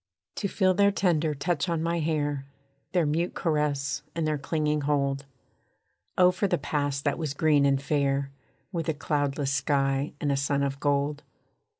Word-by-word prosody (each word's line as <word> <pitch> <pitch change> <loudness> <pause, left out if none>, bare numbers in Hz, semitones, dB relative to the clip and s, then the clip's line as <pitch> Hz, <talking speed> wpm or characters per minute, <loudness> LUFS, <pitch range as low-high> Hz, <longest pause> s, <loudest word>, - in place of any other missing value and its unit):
To 200 - -1
feel 190 -1 +2
their 200 +2 +4
tender 165 -6 +1
touch 175 +4 -1
on 165 -1 0
my 170 +1 0
hair, 145 -3 -1 0.4
Their 175 -3 +2
mute 165 +4 0
caress, 150 -3 0
and 165 -1 0
their 155 -1 0
clinging 150 0 0
hold; 140 -1 0 0.9
Oh 180 0 +6
for 180 +3 0
the - - +1
past 145 -1 -2
that 145 +1 0
was 150 -3 -3
green 145 -2 +4
and 135 -1 +2
fair, 140 -1 0 0.4
With 165 -4 -2
a 160 - 0
cloudless 145 -1 -1
sky, 135 0 +1
and 145 - 0
a 140 - +1
sun 140 0 +1
of 140 0 -2
gold! 145 0 0
145 Hz, 170 wpm, -27 LUFS, 140-160 Hz, 0.9 s, Oh